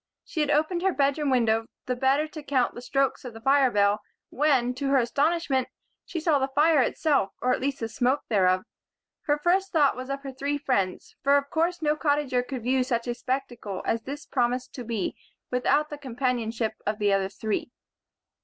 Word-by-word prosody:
She 330 - -5
had 300 - +1
opened 310 +4 +1
her 385 +1 +2
bedroom 285 +1 +1
window 225 -3 +2 0.2
the 250 - -1
better 270 +4 +2
to 310 0 -9
count 265 -4 +1
the 240 - -8
strokes 270 +1 0
of 245 -3 -8
the - - -8
fire 270 +1 +4
bell 205 -1 +2 0.3
when, 265 -4 +2
to 275 +2 -3
her 275 0 +4
astonishment, 275 +2 +1 0.4
she 340 - -3
saw 315 -3 +2
the 265 - +1
fire 295 +2 +4
itself 275 -4 +1
or 250 0 +2
at - - -1
least 275 0 -2
the 225 - -1
smoke 250 +5 +1
thereof. 185 -4 +3 0.6
Her 295 0 +2
first 365 +5 +1
thought 295 -4 +3
was 255 +2 -7
of 275 0 -4
her 270 - -5
three 280 +2 -2
friends; 225 -10 -1
for 280 +1 +4
of 280 0 -3
course 335 +1 0
no 300 0 +2
Cottager 285 -4 +1
could 250 -1 -6
view 255 +1 +2
such 235 -2 -1
a 240 - -1
spectacle 240 -5 -4
as 230 - 0
this 280 +5 -7
promised 250 0 -1
to 250 - -6
be 225 -5 -2 0.4
without 290 +4 +1
the 295 - -6
companionship 240 -4 -1
of 210 0 -1
the 205 -2 +2
other 195 -1 +1
three. 215 +3 -3
265 Hz, 200 wpm, -26 LUFS, 240-290 Hz, 0.6 s, fire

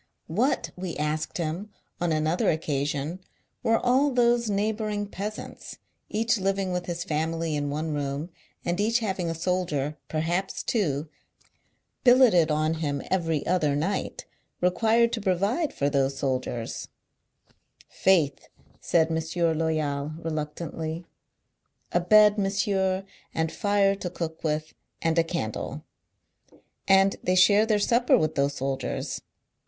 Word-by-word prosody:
What, 225 - 0
we 180 -2 -5
asked 150 +1 -2
him 170 +5 -3 0.3
on 175 -1 0
another 155 +2 +1
occasion, 150 +1 -1 0.4
were 225 0 +3
all 260 +5 +3
those 240 -3 +2
neighbour 215 +2 0
ing 205 0 -2
peasants, 205 +1 -7 0.3
each 225 +1 +1
living 195 -1 0
with 180 -1 -3
his 175 -1 -3
family 165 -1 -1
in 145 -1 -1
one 155 +2 -2
room, 145 +3 -3 0.3
and 175 +2 -1
each 225 +3 +3
having 190 -7 -2
a 165 - -2
soldier 160 -4 -1
(perhaps 170 +5 -1
two) 160 - 0 1.0
billeted 245 -10 +6
on 155 +1 +1
him 140 -3 -1
every 165 -5 0
other 160 -5 +2
night, 165 +8 -2 0.3
re 180 0 +3
quired 230 +3 +3
to 225 - -2
provide 200 - +1
for 140 - -1
those 135 -1 +1
soldiers 130 -4 -3 0.6
1 - - -33
'• - - -46 0.4
Faith! 160 -8 +2 0.2
" - - -31
said 165 -1 +4
M. 160 +1 0
Loyal, 155 -2 -1
reluctantly; 160 +1 -4 0.9
"a 175 - +3
bed, 210 +3 +6
monsieur, 195 -1 +1 0.3
and 160 0 0
fire 200 -2 +2
to 195 -2 -4
cook 165 -2 -5
with, 155 0 -1 0.3
and 165 0 +1
a - - +5
candle. 165 -10 -4 1.0
Andthey 195 -1 +3
share 205 +4 +6
theirsupper 230 +3 +3
with 155 0 0
those 140 0 0
soldiers. 135 -1 -3
170 Hz, 135 wpm, -26 LUFS, 155-200 Hz, 1.0 s, billeted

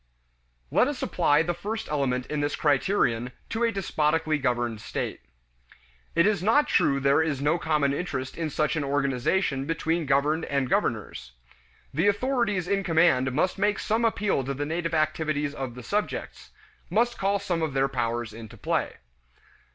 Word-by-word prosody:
Let - - +4
us - - -3
apply 145 +2 +3
the 175 +1 -1
first 210 +6 -5
element 130 -4 -1
in 150 +2 -3
this 145 0 -1
criterion 130 - +1 0.2
to 225 +1 -1
a 230 - +3
despotically 160 -5 0
governed 120 -4 -1
state. - - -4 0.9
It 170 - +4
is 210 -2 +2
not 225 +10 +3
true 140 0 +2
there 140 +3 +3
is 155 -4 -1
no 150 +5 +1
common 150 -3 +1
interest 140 -5 -4
in 165 -2 -2
such 150 +1 0
an 155 - -1
organization 140 +2 0
between 165 0 -1
governed 150 +4 +2
and 140 -2 0
governors. - - -1 0.6
The 165 +8 +2
authorities 210 -4 +1
in 195 0 +1
command 160 -7 +3
must 180 +9 0
make 205 0 +2
some 225 +2 0
appeal 205 -9 +1
to 135 +1 -3
the 145 +2 -2
native 165 +1 -2
activities 155 -2 0
of 135 -4 -5
the 125 - -9
subjects, 205 - -3 0.4
must 235 +7 +1
call 195 +1 +2
some 185 -4 -2
of 155 -4 -1
their 135 0 +3
powers 120 -4 -2
into 110 -1 -10
play. - - -1
155 Hz, 165 wpm, -26 LUFS, 135-185 Hz, 0.9 s, Let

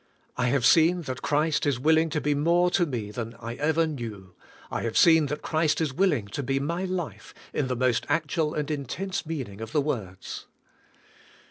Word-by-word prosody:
I 125 0 0
have 130 -1 +2
seen 170 +2 +5
that 130 -4 -5
Christ 150 +1 +1
is 135 -4 +1
willing 160 +3 +3
to 155 - -1
be 150 0 +1
more 170 +5 +3
to 175 -2 +2
me 115 -7 -4
than 115 +1 -5
I 115 0 -5
ever 160 +2 +2
knew; 110 - -6 0.4
I - - -2
have 115 -1 -2
seen 160 -3 +6
that 150 +1 -4
Christ 155 -1 +1
is 155 -5 -1
willing 150 - +2
to 125 - -3
be 135 0 0
my 170 +6 -2
life 180 -3 -5 0.2
in 140 - 0
the 130 - -1
most 125 -1 +1
actual 155 +1 0
and 150 0 -2
intense 170 +7 -3
meaning 125 -11 -5
of 115 - -7
the 150 - +3
words." 105 -11 -5
150 Hz, 195 wpm, -26 LUFS, 125-160 Hz, 0.4 s, seen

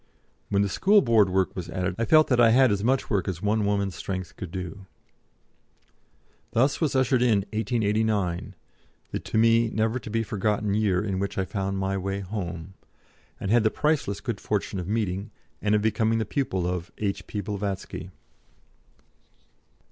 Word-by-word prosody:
When 100 0 +2
the - - +1
School 200 - +4
Board 110 -5 +4
work 95 0 0
was 85 -2 -5
added 90 +2 -2
I 115 - +1
felt 155 +5 +6
that 125 -2 +4
I 115 - +7
had 130 +1 +5
as 100 0 0
much 130 +3 +1
work 100 -5 0
as 90 -3 -3
one 105 +1 +1
woman's 100 -2 0
strength 95 -8 -5
could 90 - -7
do. 95 +2 -7 1.7
Thus 135 +7 +2
was 150 -4 +1
ushered 130 -1 +3
in 115 -5 +3
1889, 110 -5 0 0.6
the - - -2
to - - -3
me 115 +1 +4
never 110 +3 0
to 110 - -9
be 115 +1 0
forgotten 105 -1 -1
year 100 -3 +1
in 95 -2 -2
which 100 0 -3
I 95 - +1
found 95 +1 -3
my 95 0 -1
way 100 +1 -3
"Home," 90 -3 -5 0.7
and 95 - -2
had 120 +1 +5
the 110 - +4
priceless 150 -8 0
good 115 -6 -4
fortune 100 -2 -2
of 90 - -5
meeting, 100 -1 -1 0.3
and 105 0 +2
of 105 - +1
becoming 110 +1 +1
the 110 - 0
pupil 95 -8 -1
of, 90 +1 -3
H.P. 100 0 -3
Blavatsky. 100 -1 -4
105 Hz, 170 wpm, -26 LUFS, 95-115 Hz, 1.7 s, I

